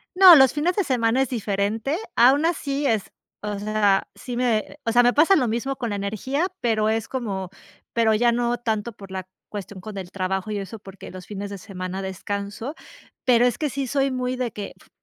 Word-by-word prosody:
No, 370 -2 +10
los 265 -4 +6
fines 330 +4 0
de 400 - +2
semana 245 -3 +2
es 270 - 0
diferente, 220 +4 -1 0.2
aún 270 +6 +5
así 290 -4 -1
es 220 -6 0 0.3
o 210 -1 -3
sea, 205 -1 +2
sí 245 -2 -6
me 235 -4 0
o 230 - +1
sea, 240 +2 +6
me 245 0 +4
pasa 320 +7 +5
lo 255 - +2
mismo 240 +5 -2
con 240 -3 -3
la 205 - -2
energía, 220 - -1
pero 220 -2 +1
es 225 0 -1
como, 200 -8 -4 0.4
pero 225 -2 +3
ya 235 +2 +3
no 240 0 0
tanto 225 -1 -2
por 195 -1 -12
la 190 -1 -6 0.2
cuestión 200 -2 -7
con 210 +1 -8
el 185 -2 -6
trabajo 190 +2 -2
y 210 - -2
eso 200 +3 -7
porque 195 -2 -11
los 185 -1 -9
fines 200 0 -6
de 200 - -6
semana 185 0 -6
descanso. 200 - -5 0.5
Pero 245 -1 +5
es 245 - +1
que 300 - -1
sí 275 0 -3
soy 275 +1 +1
muy 255 0 -2
de 250 -2 -2
que 205 -1 -7
f - - -22
225 Hz, 210 wpm, -24 LUFS, 200-255 Hz, 0.5 s, No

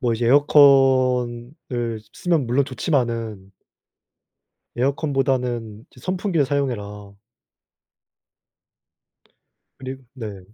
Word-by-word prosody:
뭐 120 -4 +1
이제 115 +1 -1
에어컨을 130 -3 +4 0.6
쓰면 165 -8 0
물론 130 +4 +2
좋지만은 115 - -2 1.2
에어컨보다는 125 -5 -1
이제 125 - -18
"선풍기를 185 -4 0
사용해라." 105 -8 -3 2.6
그리 130 0 -6 0.2
네. 105 -7 -7
130 Hz, 195 characters per minute, -22 LUFS, 115-140 Hz, 2.6 s, 에어컨을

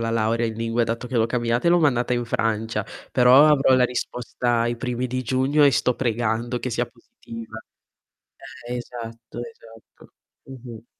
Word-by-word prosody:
la 115 - -2
laurea 115 +1 +1
in 110 - -4
lingue, 115 +1 0
dato 115 +2 -3
che 125 - -3
l'ho 115 -1 +3
cambiata 120 +2 -1
e 170 - +5
l'ho 175 - +5
mandata 125 -6 +1
in 120 - -1
Francia, 110 -2 -1 0.3
però 130 +4 +6
avrò 140 -3 +4
la 125 -1 +4
risposta 120 -1 -2
ai 120 +1 0
primi 125 +1 -3
di 130 +1 -3
giugno 130 +5 +1
e 140 - +6
sto 125 -1 +1
pregando 120 0 -1
che 125 - -4
sia - - -1
positiva. 115 -1 -11 1.1
Eh, 125 - -3
esatto, 115 -2 -8
esatto. 115 -5 -16 0.3
Mh-mh. 120 -4 -11
120 Hz, 170 wpm, -23 LUFS, 115-125 Hz, 1.1 s, però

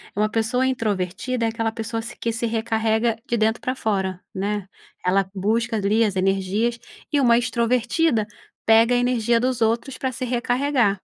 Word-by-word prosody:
Uma 215 +1 +1
pessoa 230 +4 +1
introvertida 230 0 -1
é - - +2
aquela 225 0 -1
pessoa 225 0 -4
se 235 +2 -7
que 230 - -1
se 230 +1 -2
recarrega 225 0 0
de 235 - 0
dentro 220 +2 +1
pra 255 - -2
fora, 190 -6 -1
né, 200 0 -2 0.4
ela 190 +1 +2
busca 225 +4 0
ali 215 +2 +2
as 205 -3 0
energias 195 +5 0 0.3
e 295 - +2
uma 235 -3 +5
extrovertida 240 +2 +1 0.4
pega 225 +2 +5
a - - +3
energia 240 -2 +2
dos 250 0 -1
outros 230 +4 0
pra 260 - -2
se 255 +1 -6
recarregar. 245 -3 +1
225 Hz, 170 wpm, -23 LUFS, 215-245 Hz, 0.4 s, uma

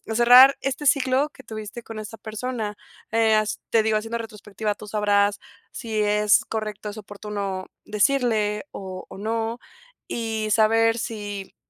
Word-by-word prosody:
cerrar 250 +3 +8
este 275 +2 -2
ciclo 265 +2 +3
que 265 - -16
tuviste 215 +1 -8
con 225 -1 -8
esta 215 +1 -8
persona. 220 0 -4 0.4
Eh, 225 -1 +4
has 215 0 0
te 225 -1 +3
digo, 220 -1 +2
haciendo 225 +2 -3
retrospectiva, 210 -1 -4
tú 210 +1 -12
sabrás 205 -1 +2 0.3
si 220 -4 -3
es 210 0 +3
correcto, 215 -1 -4
es 205 - -9
oportuno 200 -2 -5 0.2
decirle, 215 -2 +1
o 190 -1 -7
o - - -11
no. 225 +2 -2 0.5
Y 220 -2 -2
saber 225 +1 +4
si, 205 -4 -5
215 Hz, 145 wpm, -24 LUFS, 210-230 Hz, 0.5 s, cerrar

